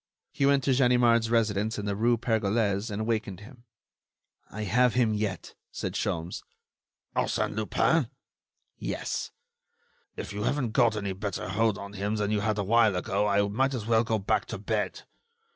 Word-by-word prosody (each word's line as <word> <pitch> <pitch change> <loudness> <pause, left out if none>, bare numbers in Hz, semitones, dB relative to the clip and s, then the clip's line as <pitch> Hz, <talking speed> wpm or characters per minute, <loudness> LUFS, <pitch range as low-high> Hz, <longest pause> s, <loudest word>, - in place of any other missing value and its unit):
He 140 - +1
went 140 -1 +3
to 135 - +2
Ganimard's 120 -3 +4
residence 110 -2 +1
in 105 - -4
the 100 -1 -1
rue 115 +3 +2
Pergolese 110 -2 0
and 105 +1 -3
wakened 110 -4 -2
him. 120 +2 -14 0.8
"I 105 +2 -5
have 125 +4 +2
him 120 -3 +3
yet," 105 -4 -3 0.2
said - - -4
Sholmes. 85 +1 -3 0.7
"Arsène - - 0
Lupin?" 115 +6 +1 0.7
"Yes." - - -3 0.9
"If - - -6
you 105 - -4
haven't 125 +1 0
got 115 -2 +3
any 100 -2 -2
better 95 -1 -4
hold 110 +1 +1
on 100 0 -8
him 105 +1 -2
than 105 -1 -1
you 105 - +1
had 105 +1 0
a 100 - 0
while 110 0 +4
ago, 100 +3 0
I 100 0 +2
might 135 +6 0
as 110 -4 -4
well 115 0 +3
go 115 -1 0
back 100 - 0
to - - -5
bed. - - -2
110 Hz, 170 wpm, -28 LUFS, 100-120 Hz, 0.9 s, Ganimard's